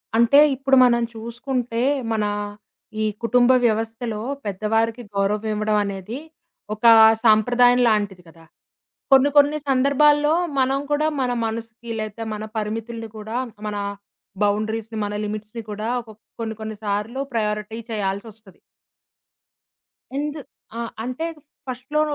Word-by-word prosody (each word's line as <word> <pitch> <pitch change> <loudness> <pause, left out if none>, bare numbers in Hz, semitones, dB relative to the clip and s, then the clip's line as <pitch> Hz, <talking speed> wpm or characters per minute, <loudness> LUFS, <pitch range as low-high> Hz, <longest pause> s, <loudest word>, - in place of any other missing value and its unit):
అంటే 235 +5 +6 0.2
ఇప్పుడు 270 0 +2
మనం 235 -1 +3
చూసుకుంటే 235 +1 -3 0.3
మన 215 -2 +1 0.8
ఈ - - +2 0.2
కుటుంబ 245 +2 +4
వ్యవస్థలో 225 0 -1 0.3
పెద్దవారికి 225 +4 0
గౌరవం 205 +2 0
ఇవ్వడం 215 0 +1
అనేది, 200 +6 -5 0.5
ఒక 215 +2 -6 0.4
సాంప్రదాయం 245 +3 +5
లాంటిది 205 -4 0
గదా! 165 0 -17 0.7
కొన్ని 270 +1 +6
కొన్ని 290 +1 +5
సందర్భాల్లో 295 +3 +4 0.3
మనం 265 +1 +2
కూడా 300 +1 +2
మన 250 -1 0
మనసుకి 230 +1 -6
లేతే 215 +1 -5
మన 215 0 -5
పరిమితులని 225 +1 -4
గూడా 220 +2 -5 0.3
మన 210 - -3 0.7
బౌండరీస్‌ని 220 +2 -1
మన 205 - -4
లిమిట్స్‌ని 215 +2 -6
కూడా 215 +2 -3
ఒక 220 - -13 0.3
కొన్ని 220 -1 -3
కొన్ని 220 0 -5
సార్లు 210 +5 -2
ప్రయారిటీ 210 0 -2
చేయాల్సొస్తది. 205 0 -5 1.6
ఎందు 295 +2 -2 0.4
ఆ! - - -3 0.2
అంటే 255 +7 -3 0.4
ఫస్ట్‌లో 255 +4 -2
225 Hz, 115 wpm, -22 LUFS, 215-250 Hz, 1.6 s, అంటే